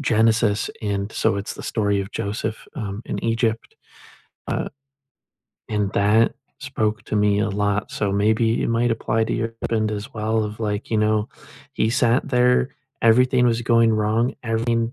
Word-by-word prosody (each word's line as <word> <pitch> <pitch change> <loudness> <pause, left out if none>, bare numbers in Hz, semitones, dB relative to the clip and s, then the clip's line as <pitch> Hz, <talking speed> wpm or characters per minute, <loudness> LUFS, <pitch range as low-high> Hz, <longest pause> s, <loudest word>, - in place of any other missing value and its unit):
Genesis, 110 -4 +2
and 100 0 -2
so - - +1
it's 100 +1 -4
the - - -9
story 100 -3 0
of 95 +2 -6
Joseph, 105 +2 -4
um, 105 +1 -5
in - - -4
Egypt, 115 0 -1 0.7
uh, - - -1 1.0
and 105 -2 0
that 105 +3 +3 0.3
spoke 110 -6 -2
to 110 - -2
me 105 0 +3
a 105 - +1
lot, 100 +1 -1
so 100 -2 -1
maybe 110 +3 +2
it - - -1
might 115 +1 +1
apply 110 0 0
to - - -3
your 115 0 -2
husband 110 -1 0
as 105 0 -6
well 110 0 0
of, 105 +1 -7
like, 105 0 -3
you 110 - +2
know, 105 0 +2 0.5
he 110 - +1
sat 125 +2 +2
there, 125 0 +3 0.3
everything 125 +2 +4
was 120 0 +1
going 115 -1 +4
wrong, 110 +4 +1
everything 115 +1 0
110 Hz, 165 wpm, -22 LUFS, 105-115 Hz, 1.0 s, everything